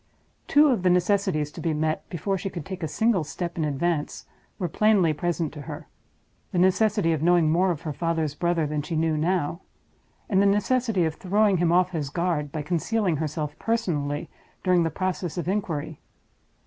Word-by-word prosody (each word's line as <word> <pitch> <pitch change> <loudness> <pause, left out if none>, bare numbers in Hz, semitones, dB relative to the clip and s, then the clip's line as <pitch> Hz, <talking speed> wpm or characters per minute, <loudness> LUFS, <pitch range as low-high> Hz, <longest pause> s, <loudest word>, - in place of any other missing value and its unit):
Two 295 +1 +5
of 240 -8 +1
the 185 - +3
necessities 180 -4 +1
to - - -9
be 165 -2 0
met, 155 +1 -2
before 195 +3 -2
she 190 +1 -3
could 170 -5 -7
take 190 -2 -6
a 160 - -1
single 210 +3 +1
step 170 +2 -5
in 165 - -1
advance, 150 +2 -1 0.3
were 180 - -2
plainly 200 -5 +3
present 170 0 -2
to 150 - -8
her—the 145 - -11
necessity 190 0 +3
of 155 - -2
knowing 170 -2 +4
more 180 +3 +3
of 170 -3 -3
her 155 -3 -3
father's 165 -2 -1
brother 170 0 0
than 150 0 -2
she 160 +3 -4
knew 160 0 +1
now; 170 +1 0 0.7
and 195 -3 +3
the 200 - +4
necessity 210 -1 +2
of 160 - -1
throwing 200 +3 +2
him 170 -1 +2
off 180 +1 +3
his 155 -5 -3
guard 165 -3 -1
by 155 0 -4
concealing 180 +2 0
herself 150 -1 -4
personally 155 -11 -1 0.4
during 180 -1 +3
the 165 - +1
process 180 0 -3
of 175 - -3
inquiry. 160 -6 -2
175 Hz, 185 wpm, -25 LUFS, 155-190 Hz, 0.7 s, Two